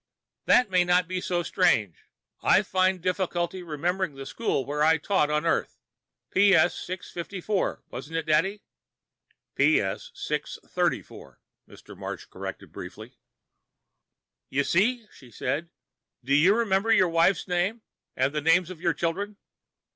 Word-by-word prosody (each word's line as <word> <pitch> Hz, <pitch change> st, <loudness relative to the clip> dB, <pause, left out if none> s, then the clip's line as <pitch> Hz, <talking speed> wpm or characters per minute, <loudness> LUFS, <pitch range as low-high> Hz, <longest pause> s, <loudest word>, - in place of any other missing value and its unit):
"That 245 Hz, -6 st, +4 dB
may 180 Hz, -1 st, +4 dB
not 180 Hz, 0 st, +2 dB
be 185 Hz, 0 st, -3 dB
so 175 Hz, -1 st, -1 dB
strange. 105 Hz, -, +2 dB, 0.5 s
I 200 Hz, -, +4 dB
find 185 Hz, -2 st, +1 dB
difficulty 180 Hz, -1 st, -1 dB
remembering 175 Hz, +1 st, -2 dB
the 135 Hz, 0 st, -8 dB
school 140 Hz, -, -2 dB
where 150 Hz, +1 st, -3 dB
I 160 Hz, +1 st, +5 dB
taught 160 Hz, -2 st, +1 dB
on 150 Hz, +2 st, 0 dB
Earth. 165 Hz, -, 0 dB, 0.5 s
P.S. 190 Hz, -2 st, +5 dB
654, 185 Hz, +2 st, -4 dB
wasn't 145 Hz, +6 st, -6 dB
it, 165 Hz, -, -2 dB
Dad?" 175 Hz, +7 st, +1 dB, 0.9 s
"P.S. 140 Hz, -10 st, +1 dB
634," -, -, -3 dB, 0.3 s
Mr. -, -, -14 dB
Marsh -, -, -6 dB
corrected -, -, -8 dB
briefly. -, -, -9 dB, 1.4 s
"You 140 Hz, +1 st, +1 dB
see?" 225 Hz, -, +1 dB
she 125 Hz, -, -16 dB
said. 155 Hz, +7 st, -3 dB, 0.5 s
"Do 135 Hz, +3 st, 0 dB
you 170 Hz, +8 st, +5 dB
remember 225 Hz, -1 st, +1 dB
your 185 Hz, -5 st, +5 dB
wife's 165 Hz, +4 st, +2 dB
name? 185 Hz, +5 st, -1 dB, 0.3 s
And 130 Hz, +2 st, +1 dB
the 150 Hz, -, -1 dB
names 165 Hz, +3 st, +3 dB
of 170 Hz, -3 st, -10 dB
your -, -, +1 dB
children?" 200 Hz, +5 st, -2 dB
175 Hz, 130 wpm, -26 LUFS, 155-190 Hz, 1.4 s, I